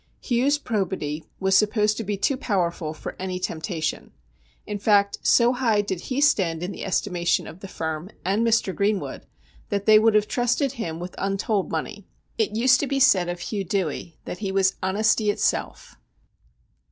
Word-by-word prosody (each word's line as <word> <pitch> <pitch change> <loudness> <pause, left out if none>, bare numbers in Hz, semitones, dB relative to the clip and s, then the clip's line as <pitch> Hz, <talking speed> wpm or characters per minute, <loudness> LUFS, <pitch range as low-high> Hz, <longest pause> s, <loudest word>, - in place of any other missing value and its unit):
Hugh's 265 +4 +1
probity 190 - -3
was 190 0 +2
supposed 210 +1 +3
to 225 - -3
be 205 0 -2
too 205 +8 +1
powerful 180 - -1
for 155 - -7
any 185 0 -3
temptation. 165 -2 -3 0.5
In 205 -1 -4
fact, 200 -1 +3
so 240 +1 +4
high 230 -5 +2
did 190 -4 -4
he 260 +1 -1
stand 180 - +2
in 180 - -3
the - - -7
estimation 175 -2 0
of 170 - -10
the 195 - -8
firm 160 0 -4 0.2
and 200 +5 +1
Mr. 225 -4 +2
Greenwood 200 0 -1 0.4
that 200 -1 -2
they 215 -1 +7
would 220 0 +3
have 210 0 +3
trusted 245 +3 0
him 165 -10 -5
with 180 +1 -7
untold 195 +1 -1
money. 180 +5 -5 0.3
It 215 -1 0
used 255 +2 +4
to 285 - -1
be 275 0 0
said 185 -9 +4
of 175 0 -5
Hugh 205 -3 -3
Dewey 170 -3 -3
that 180 - -6
he 200 -2 -3
was 195 0 +2
' - - -37
honesty 210 +3 +2
itself.' 205 - -1
200 Hz, 175 wpm, -24 LUFS, 180-220 Hz, 0.5 s, they